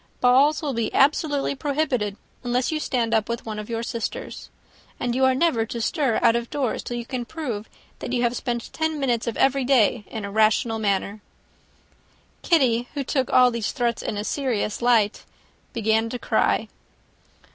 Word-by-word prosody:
Balls 275 +6 +4
will 285 -3 -1
be 230 -2 -1
absolutely 285 0 +2
prohibited, 270 -8 -1 0.3
unless 245 +2 0
you 310 - -1
stand 235 -6 -1
up 220 -1 +1
with 235 0 -3
one 215 -1 -5
of 210 - -8
your 230 0 -2
sisters. 235 - -5 0.5
And 245 -1 -1
you 260 +1 +3
are 260 0 +3
never 265 -6 +2
to 235 - -5
stir 245 +1 0
out 230 -1 +5
of 235 0 -2
doors, 270 -5 -1
till 240 - -5
you 235 - -5
can 250 0 -4
prove 235 -7 -5 0.3
that - - -5
you 245 -1 0
have 240 0 +1
spent 240 -2 -4
ten 315 -1 -1
minutes 240 -5 0
of 235 - -2
every 270 0 +3
day 245 -4 +3
in 220 -2 -6
a 200 - -6
rational 220 +1 +2
manner." 200 0 -1 1.2
Kitty, 245 -7 +2
who 280 - -1
took 265 -1 -1
all 250 -1 +6
these 230 -2 -2
threats 240 -4 -1
in 210 - -3
a 205 - -2
serious 235 -4 -2
light, 230 -4 +2 0.5
began 220 -1 +1
to 250 - -4
cry. - - +1
240 Hz, 180 wpm, -24 LUFS, 225-270 Hz, 1.2 s, all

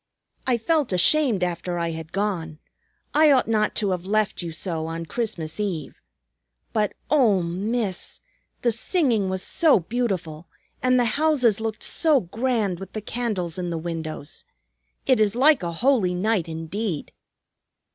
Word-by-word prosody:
"I 250 -2 +3
felt 290 +2 +1
ashamed 205 - +4
after 175 0 -2
I 170 -1 -1
had 160 0 -7
gone. 180 -6 -2 0.6
I 305 +1 +6
ought 260 -3 +4
not 215 -1 +1
to 205 -3 0
have 180 -2 -2
left 210 +1 0
you 170 -1 -5
so, 160 -1 -3
on 165 +1 -4
Christmas 180 -6 -3
Eve. 180 -8 -3 0.7
But 210 -2 +1 0.2
oh, 225 - +4
Miss! 195 +3 -3 0.4
The 240 - +3
singing 230 - +1
was 190 0 -2
so 320 - +3
beautiful, 180 -6 -3 0.3
and 255 0 +3
the 245 - +3 0.2
houses 255 -9 +3
looked 220 -1 -4
so 310 -4 +3
grand 215 -2 -1
with 195 -1 -9
the 215 - -4
candles 205 -7 -3
in 175 -1 -2
the 170 - -2
windows. 160 -3 -5 0.6
It 260 -3 +4
is 215 0 +2
like 290 +2 +5
a 170 -1 -2
holy 195 -1 +2
night 200 -2 0
indeed!" 165 +2 -4
200 Hz, 150 wpm, -24 LUFS, 170-240 Hz, 0.7 s, I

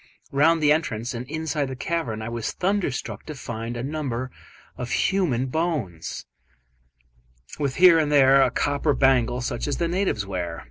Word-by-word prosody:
Round 155 +3 +3
the 145 - +5
entrance 125 -7 0
and 125 +2 -6
inside 155 -2 -2
the 130 - -5
cavern 125 -7 -3
I 110 - -4
was 115 -1 -3
thunderstruck 180 - -2
to 155 - -6
find 120 -2 -5
a 120 - -4
number 130 -4 -3 0.4
of 125 -1 -5
human 165 -11 +1
bones, 130 - -3 1.3
with 140 -3 -1
here 175 -2 +7
and 150 -2 0
there 135 -1 +6
a - - +4
copper 145 +1 0
bangle 125 -2 +2
such 120 - -3
as 145 - -1
the 170 - 0
natives 175 - -1
wear. 90 -4 -4
135 Hz, 160 wpm, -24 LUFS, 120-160 Hz, 1.3 s, here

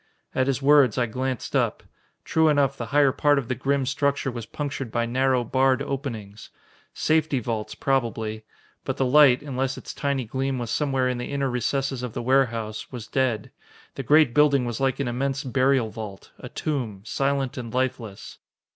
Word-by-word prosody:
At 130 0 +1
his 135 0 -1
words, 140 -5 +5
I 125 - +2
glanced 130 +2 -3
up. - - +1 0.4
True 160 0 +3
enough, 140 -2 +2
the 120 -3 -5
higher 140 +2 +4
part 145 +2 +3
of 130 -4 -2
the - - +1
grim 135 +1 0
structure 140 0 0
was 120 -2 -7
punctured 140 -5 -4
by 120 0 0
narrow, 130 +1 +1
barred 130 +2 +2
openings. 115 -8 -6 0.4
Safety 155 -2 +1
vaults, 110 -2 -4
probably. 110 -5 -1 0.4
But - - -3
the 135 - +1
light, 130 -1 +6
unless 135 -2 -2
its - - -8
tiny 140 -3 -1
gleam 130 +3 -2
was 120 -2 -4
somewhere 135 -1 +1
in 125 -1 -1
the 125 - -5
inner 140 -2 -1
recesses 135 +2 -1
of 125 -3 -5
the - - -4
warehouse, 115 -4 0
was 120 -4 -7
dead. 125 -5 -1 0.4
The - - -5
great 150 0 +4
building 145 -3 +4
was 120 -2 -3
like 135 0 0
an 140 - -1
immense 135 +3 -1
burial 130 -3 +2
vault, 105 -3 -8
a - - -8
tomb 120 -10 -3
silent 135 0 -1
and 120 -3 -6
lifeless. 120 -5 -3
130 Hz, 180 wpm, -25 LUFS, 120-140 Hz, 0.4 s, light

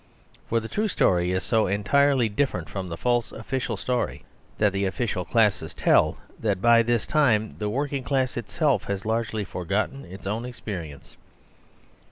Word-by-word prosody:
For 115 - +2
the 110 - -6
true 215 - -1
story 90 - +2
is 95 0 -1
so 110 -2 +2
entirely 125 +6 +3
different 105 - -1
from 95 +5 -5
the 85 - -5
false 120 +1 0
official 130 +3 -3
story 125 -1 -2 0.3
that 105 -2 +2
the 100 0 0
official 95 -1 -1
classes 105 -8 +1
tell - - +3 0.2
that 100 -4 0
by 115 +3 +6
this 120 -1 +1
time 115 -8 +2
the 105 -1 -1
working 140 +3 -1
class 130 -1 0
itself 120 - 0
has 100 0 -3
largely 110 -1 -1
forgotten 100 +8 -2
its 95 +2 -11
own 110 +4 -2
experience. 90 - -7
110 Hz, 160 wpm, -25 LUFS, 95-125 Hz, 0.3 s, by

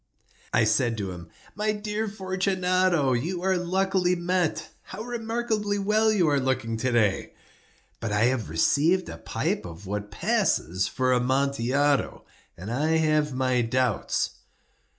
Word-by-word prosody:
I 115 - +3
said 115 +2 +2
to 100 -3 -3
him: 85 -2 -9 0.2
"My 215 +1 0
dear 210 +1 -3
Fortunato, 185 -6 +1
you 170 +9 -2
are 190 0 +2
luckily 185 0 +1
met. 175 -1 -1
How 215 - -8
remarkably 225 -3 -2
well 215 +2 +2
you 190 -6 +2
are 145 -1 +2
looking 130 -3 -1
to 130 +3 -1
day! 110 -5 +1 0.7
But 115 - -3
I 105 0 +1
have 120 - +1
received 155 - +2
a 80 - -7
pipe - - -2
of 85 +3 -10
what 105 +2 -4
passes 95 -2 0
for 130 +1 +1
Amontillado, 135 +2 +1 0.3
and 95 +6 -7
I 155 +6 +1
have 155 -3 +1
my 130 -1 +1
doubts." 120 -1 -1
145 Hz, 140 wpm, -26 LUFS, 120-185 Hz, 0.7 s, I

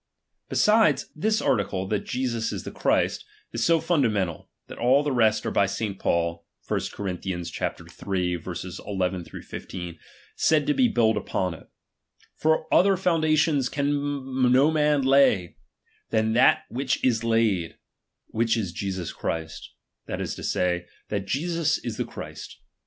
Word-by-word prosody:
Besides, 210 - +3
this 215 +7 0
article, 100 -7 0
that 105 -2 -1
Jesus 120 -3 -1
ia - - -3
the - - -7
Christ, - - +1 0.3
is 115 0 -1
so 165 +3 +4
fundamental, 110 - 0 0.2
that - - -11
all 130 +4 +4
the 145 - -1
rest 110 -4 +2
are - - -1
by 100 - +3
St. 100 0 -3
Paul 85 0 0 0.2
(1 - - 0 0.2
Cor. 100 - -4
iii. 90 -1 -2
INlfj) 85 -2 -4 2.6
said 155 -2 +3
to 150 - +2
be 250 - +4
built 110 - +2
upon 90 -2 -2
it: 80 - -14 0.7
Foi 160 0 +2
other 195 +1 +5
foundation 155 -4 +2
can 140 -2 0
no 135 +5 +5
man 150 -2 +2
lay, 130 -10 +3 0.5
than 110 0 +1
that 125 +3 +5
which 130 +2 -1
is 115 -3 +2
laid; 110 -7 +1 0.5
which 115 +1 +1
is 100 -6 -2
Jesus 95 -1 -4
Christ; 80 -1 -4 0.4
that - - -4
ia - - -2
to - - -6
say, 90 -1 0 0.2
that 100 -2 -3
Jesus 165 - 0
is - - -6
the - - -1
Christ. - - -9
120 Hz, 140 wpm, -25 LUFS, 100-145 Hz, 2.6 s, other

